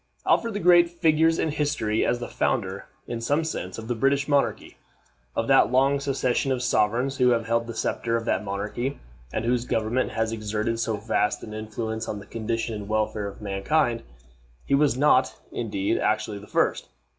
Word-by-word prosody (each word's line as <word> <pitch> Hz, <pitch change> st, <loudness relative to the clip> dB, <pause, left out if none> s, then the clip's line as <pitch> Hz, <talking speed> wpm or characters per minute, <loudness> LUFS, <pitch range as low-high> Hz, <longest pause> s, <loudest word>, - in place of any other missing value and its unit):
Alfred 230 Hz, -2 st, +2 dB
the -, -, -1 dB
Great 175 Hz, -1 st, +6 dB
figures 165 Hz, -1 st, +3 dB
in 160 Hz, -, 0 dB
history 145 Hz, -8 st, 0 dB
as 120 Hz, -, +1 dB
the 120 Hz, -, -5 dB
founder, -, -, -1 dB, 0.2 s
in 120 Hz, -1 st, -5 dB
some 145 Hz, +7 st, +1 dB
sense, 95 Hz, -, -4 dB
of 110 Hz, 0 st, -7 dB
the 120 Hz, -, 0 dB
British 140 Hz, +4 st, +1 dB
monarchy. 145 Hz, -2 st, 0 dB, 0.6 s
Of -, -, -1 dB
that -, -, +5 dB
long 135 Hz, +2 st, +3 dB
succession 135 Hz, -1 st, 0 dB
of 125 Hz, -1 st, -1 dB
sovereigns 125 Hz, +4 st, +1 dB
who 125 Hz, -2 st, +4 dB
have 115 Hz, -2 st, +2 dB
held 115 Hz, 0 st, 0 dB
the 115 Hz, -, -6 dB
scepter 115 Hz, +1 st, -1 dB
of 115 Hz, -, -5 dB
that -, -, 0 dB
monarchy, 105 Hz, +7 st, -3 dB, 0.3 s
and -, -, -2 dB
whose 120 Hz, 0 st, +1 dB
government 115 Hz, +1 st, 0 dB
has 115 Hz, 0 st, 0 dB
exerted 110 Hz, +1 st, -2 dB
so 115 Hz, -2 st, -1 dB
vast 105 Hz, 0 st, 0 dB
an 110 Hz, -, -8 dB
influence 110 Hz, +1 st, -4 dB
on 105 Hz, -, -3 dB
the 100 Hz, -, -10 dB
condition 115 Hz, +1 st, -3 dB
and 105 Hz, -1 st, -6 dB
welfare 110 Hz, -1 st, -1 dB
of 100 Hz, +1 st, -9 dB
mankind, 115 Hz, +6 st, 0 dB, 0.6 s
he -, -, -1 dB
was 140 Hz, -3 st, +3 dB
not, 130 Hz, -2 st, +3 dB
indeed, 100 Hz, -4 st, -1 dB
actually 105 Hz, -2 st, 0 dB
the 105 Hz, -, -13 dB
first. -, -, 0 dB
115 Hz, 185 wpm, -25 LUFS, 110-140 Hz, 0.6 s, Great